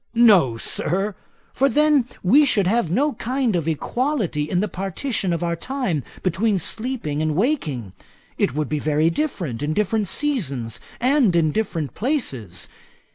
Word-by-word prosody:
'No, 195 - +5
Sir; 195 - -1 0.4
for 275 +1 +2
then 295 -2 +3 0.2
we 265 +11 +6
should 215 -9 +2
have 215 -1 +1
no 280 - +1
kind 245 -1 -1
of 165 -2 -1
equality 180 - -1
in 180 - +1
the 210 - 0
partition 195 - -3
of 170 0 -1
our 170 0 0
time 245 - -2 0.2
between 195 +4 +1
sleeping 215 - 0
and 155 -1 0
waking. 155 - -1 0.4
It 130 - 0
would 150 -1 -1
be 150 +2 -2
very 155 +2 +2
different 170 - -3
in 150 +1 -1
different 210 0 0
seasons 140 - -1 0.2
and 250 -7 +3
in 160 -2 +3
different 165 -7 -2
places. 135 - -2
190 Hz, 150 wpm, -22 LUFS, 155-250 Hz, 0.4 s, we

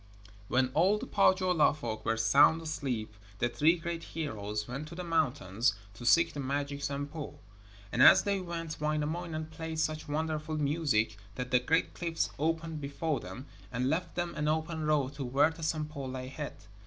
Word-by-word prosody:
When 130 +2 +2
all 185 +7 +4
the - - -5
Pohjola 185 -6 +3
folk 110 -7 -5
were 115 - +1
sound 140 +8 +5
asleep 130 -9 -3 0.2
the 120 - +1
three 160 +7 +3
great 170 0 -4
heroes 105 -8 -3
went 135 +5 -5
to 170 - -9
the 180 - -5
mountains 125 - +1 0.2
to 120 +2 -6
seek 165 +5 +5
the 145 - -5
magic 140 +1 -2
Sampo. 145 +2 -4 0.5
And 125 - +1
as 185 - +9
they 200 -1 0
went 165 -4 -5
Wainamoinen 155 +1 -2
played 160 0 -5
such 155 -1 -1
wonderful 155 +1 -2
music 140 -8 +1 0.2
that 125 +2 -4
the 125 - +5
great 155 +7 +1
cliffs 165 -2 -2
opened 160 0 -1
before 140 +2 -2
them, 130 - -8 0.3
and 125 +2 0
left 165 +2 -2
them 175 -1 -2
an 150 - -2
open 160 0 -1
road 145 -3 +2
to 140 - -3
where 140 +5 +3
the 165 +1 -11
Sampo 150 -3 -2
lay 130 0 -5
hid. 145 +1 -5
150 Hz, 175 wpm, -31 LUFS, 130-165 Hz, 0.5 s, as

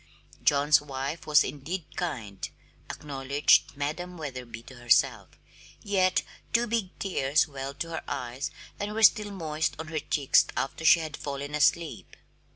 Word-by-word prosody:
John's 145 +1 +4
wife 140 +2 -5
was 150 -1 +6
indeed 150 +6 -5
kind, 115 - -4 0.4
acknowledged 140 0 +1
Madam 175 +5 -4
Wetherby 125 -6 -7
to 130 +1 -13
herself, 120 -1 +2 0.5
yet 190 -2 +2 0.3
two 235 +1 +3
big 225 -5 -2
tears 155 -5 +1
welled 140 -1 -7
to 165 - -3
her 160 - -3
eyes 125 +3 -4 0.3
and 205 +1 -3
were 225 - 0
still 210 -1 +6
moist 160 -5 -2
on 160 0 -7
her 155 -1 -2
cheeks 145 -2 +3
after 135 +4 -3
she 165 +1 +7
had 155 -2 -5
fallen 140 0 -5
asleep. 160 +2 +1
150 Hz, 145 wpm, -28 LUFS, 135-170 Hz, 0.5 s, she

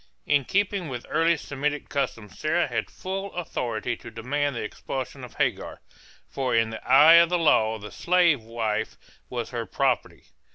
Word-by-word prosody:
In 145 -2 +2
keeping 200 -1 0
with 125 -2 -6
early 165 0 +3
Semitic 145 +1 -3
customs 115 -8 -4
Sarah 170 +3 +1
had - - -3
full 195 +1 -5
authority 120 -9 -3
to - - -10
demand 135 +5 -2
the - - -3
expulsion 130 +4 -6
of 125 - -10
Hagar, - - -1 0.5
for 130 -3 -1
in 115 0 +2
the 110 - -7
eye 155 +6 +8
of 170 - +2
the 180 - +2
law 110 -9 +3
the 105 -1 -10
slave 170 -6 +3
wife 110 -1 -3 0.3
was - - -4
her - - -4
property. - - -1
135 Hz, 165 wpm, -25 LUFS, 115-165 Hz, 0.5 s, eye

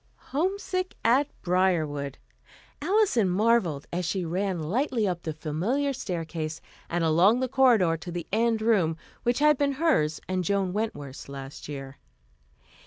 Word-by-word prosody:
Homesick 370 +4 -1
at 260 +5 +4 0.2
Briarwood! 160 -7 +1 0.6
Alison 345 - +3
marvelled 190 -7 +2
as 180 +1 -1
she 175 +2 -1
ran 185 +3 -1
lightly 225 - 0
up 175 -2 -2
the 160 - -3
familiar 185 - -1
staircase 165 -8 -4 0.3
and 175 0 0
along 175 +9 +4
the 260 - 0
corridor 235 -11 +4
to 175 +2 -8
the 175 -1 -4
end 225 0 +2
room, 185 -8 +2 0.2
which 240 0 +1
had 300 -1 +4
been 280 -1 +2
hers 260 - +1
and 185 -1 -1
Joan 195 -1 0
Wentworth's 145 -12 -4
last 135 +1 -8
year. 135 -2 -7
185 Hz, 140 wpm, -27 LUFS, 160-245 Hz, 0.6 s, at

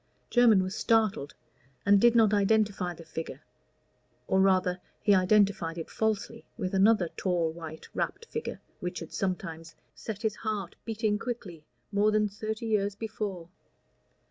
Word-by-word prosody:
Jermyn 230 -6 +6
was 185 +1 -4
startled, 215 -12 +1 0.5
and 200 -1 +5
did 240 0 +5
not 220 -3 +5
identify 205 -3 +2
the 165 - -12
figure, 160 0 -6 0.8
or 190 - +2
rather 185 -1 +2 0.2
he 205 - +5
identified 185 -3 +3
it 165 - -6
falsely 220 +1 -1
with 185 -4 -3
another 195 -2 +4
tall 175 -4 0
white 160 -1 -9
wrapped 460 - -3
figure 460 0 -5 0.2
which 180 0 -4
had 165 - -8
sometimes 165 -4 -3 0.2
set 220 -1 -7
his 215 -2 0
heart 210 -4 -3
beating 220 -2 0
quickly 195 -10 -6 0.3
more 205 +1 +3
than 215 0 +2
thirty 215 +2 -5
years 205 -2 0
before. 205 -5 -5
200 Hz, 145 wpm, -29 LUFS, 180-220 Hz, 0.8 s, Jermyn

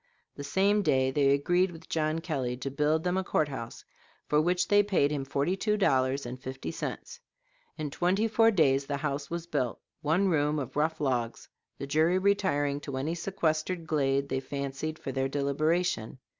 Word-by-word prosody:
The 140 - -7
same 195 +8 +2
day 130 -7 +2
they 140 0 +3
agreed 175 +7 +2
with 165 -2 -12
John 155 0 -1
Kelly 130 -7 -2
to 135 +2 -4
build 150 +3 +1
them 180 +1 0
a 190 - 0
court 155 -4 0
house, 115 -4 -7 0.4
for 150 0 +3
which 180 +2 +1
they 205 0 +5
paid 190 -8 +1
him 145 -2 -2
forty 140 +6 0
two 210 +2 0
dollars 135 -7 +2
and 125 +1 -7
fifty 130 +2 -5
cents. 480 - -6 0.6
In 150 -3 -4
twenty 185 +8 +1
four 225 +1 +4
days 140 -9 +2
the 140 - -1
house 140 0 -3
was 170 0 -4
built 135 -8 -2 0.2
one 165 +6 +2
room 150 -3 +1
of 135 -3 -5
rough 155 +2 0
logs, 125 -5 -2 0.3
the - - -5
jury 155 +5 +2
retiring 185 -8 +1
to 140 -2 -6
any 145 +5 -1
sequestered 170 -1 -1
glade 140 -3 +1
they 130 - -1
fancied 140 +3 -4
for 135 - -5
their 135 +1 0
deliberation. 145 -2 0
150 Hz, 185 wpm, -29 LUFS, 140-175 Hz, 0.6 s, they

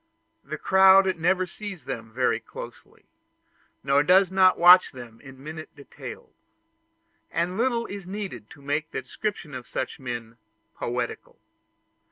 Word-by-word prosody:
The - - -6
crowd 190 0 +5
never 185 +3 +2
sees 195 -1 -9
them 115 -4 -6
very 125 +3 +1
closely, - - -12 0.8
or 140 +1 +4
does 185 +4 +4
not 185 -1 +4
watch 180 +1 +7
them 120 -3 -11
in 135 -1 -13
minute 155 +1 -9
details; 450 - -11 1.0
and 170 +2 -1
little 235 +1 0
is 200 -4 -8
needed 190 - -6
to 140 - -15
make 145 +3 -2
the - - -5
description 190 -8 -5
of 125 -1 -8
such 130 - -4
men 120 -3 -6 0.4
poetical. 120 0 -4
160 Hz, 135 wpm, -25 LUFS, 130-190 Hz, 1.0 s, watch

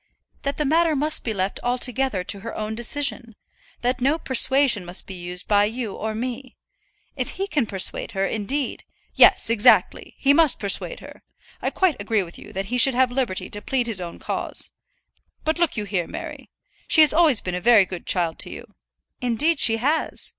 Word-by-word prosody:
"That 280 0 -3
the 300 - -1
matter 320 +2 +2
must 300 +3 0
be 225 - -2
left 195 -1 -3
altogether 250 -4 0
to 200 - -2
her 225 +3 -8
own 215 0 -4
decision; 240 0 -2 0.5
that 250 +1 -1
no 280 +5 +2
persuasion 265 - +3
must 175 +1 -3
be 195 - -9
used 180 0 -4
by 205 -1 +3
you 225 -1 -4
or 220 0 -5
me. 250 +3 -6 0.6
If - - -4
he 390 - -1
can 295 - -1
persuade 190 -2 -3
her, 195 0 -1
indeed 245 +7 -3 0.2
" - - -41
"Yes, 230 - +6
exactly. 230 +2 +3
He 280 0 +3
must 315 -3 +3
persuade 200 - 0
her. - - -13 0.4
I - - 0
quite 355 - 0
agree 210 0 0
with 170 -1 -12
you - - -13
that 195 +1 -4
he 250 - +1
should 265 +1 +5
have 255 0 +2
liberty 245 -7 -2
to 205 - -4
plead 255 +1 -1
his 220 -5 -2
own 170 -1 -7
cause. - - -3 0.7
But 315 +2 -1
look 340 -7 +1
you 210 - -2
here, 195 -4 -3
Mary; - - -9 0.4
she 320 - +5
has 305 -1 +6
always 315 -8 +4
been 180 - -5
a 180 - -3
very 225 -3 +5
good 185 -2 -9
child 170 -3 +1
to - - -5
you - - -9 0.3
" - - -53
"Indeed 275 +6 +1
she 225 -1 +4
has." 295 +7 -2
240 Hz, 200 wpm, -22 LUFS, 200-275 Hz, 0.7 s, Yes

